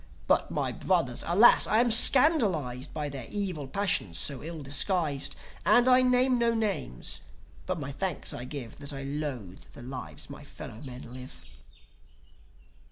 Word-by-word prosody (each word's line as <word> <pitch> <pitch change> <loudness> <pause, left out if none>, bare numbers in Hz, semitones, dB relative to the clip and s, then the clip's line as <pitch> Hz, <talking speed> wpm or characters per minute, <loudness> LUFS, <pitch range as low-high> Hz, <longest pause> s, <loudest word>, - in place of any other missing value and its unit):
But - - +1
my - - -2
brothers! 165 -10 -1
Alas! 200 +8 +6
I 215 - +2
am 240 0 +2
scandalized 205 - +5
By 150 -1 -4
their 135 -4 -7
evil 185 -9 -4
passions 135 - -1
so 140 -4 -2
ill 160 -1 -7
disguised. 145 0 +1 0.3
And 240 +5 +4
I 255 0 +6
name 250 0 +2
no 235 0 +1
names, 195 - -3 0.5
but 185 -2 -3
my 140 -1 -6
thanks 165 +3 -3
I 125 - -7
give 130 -4 -8
That 145 +1 -6
I 135 0 -7
loathe 135 -10 -6
the - - -12
lives 130 0 -8
my - - -11
fellow 110 - -11
men 125 -2 -10
live." 130 0 -12
150 Hz, 155 wpm, -28 LUFS, 130-210 Hz, 0.5 s, Alas